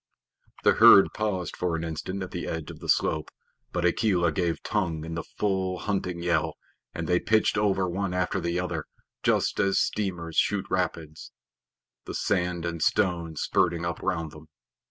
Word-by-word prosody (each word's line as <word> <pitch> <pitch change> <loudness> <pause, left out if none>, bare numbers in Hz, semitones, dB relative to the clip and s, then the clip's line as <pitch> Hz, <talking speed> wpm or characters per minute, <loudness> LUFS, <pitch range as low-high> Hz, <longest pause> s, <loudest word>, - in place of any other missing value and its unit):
The - - +5
herd 100 - +8
paused 100 -4 -2
for 90 -2 -1
an 80 - -3
instant 85 +4 -4
at 90 - -7
the 85 - -4
edge 80 -2 -4
of - - -12
the - - -9
slope, 80 -1 +1 0.4
but 90 -1 -1
Akela 90 -2 +2
gave 85 0 -1
tongue 85 -7 -1
in 80 - -6
the 85 - -2
full 95 -2 -2
hunting 90 -4 -2
yell, 85 -3 +1 0.4
and 85 - -5
they 90 0 +3
pitched 110 -1 +2
over 95 -3 +1
one 95 +2 -2
after 90 0 0
the 85 +1 -1
other, 85 -4 -3 0.4
just - - +1
as 100 0 +2
steamers 90 -6 -1
shoot 100 -2 +2
rapids, 85 -4 -3 0.7
the - - -6
sand 90 -1 0
and 85 -1 -3
stones 85 -3 +1
spurting 85 0 +1
up 85 - -3
round 80 -2 -2
them. 75 0 -13
90 Hz, 170 wpm, -27 LUFS, 85-95 Hz, 0.7 s, herd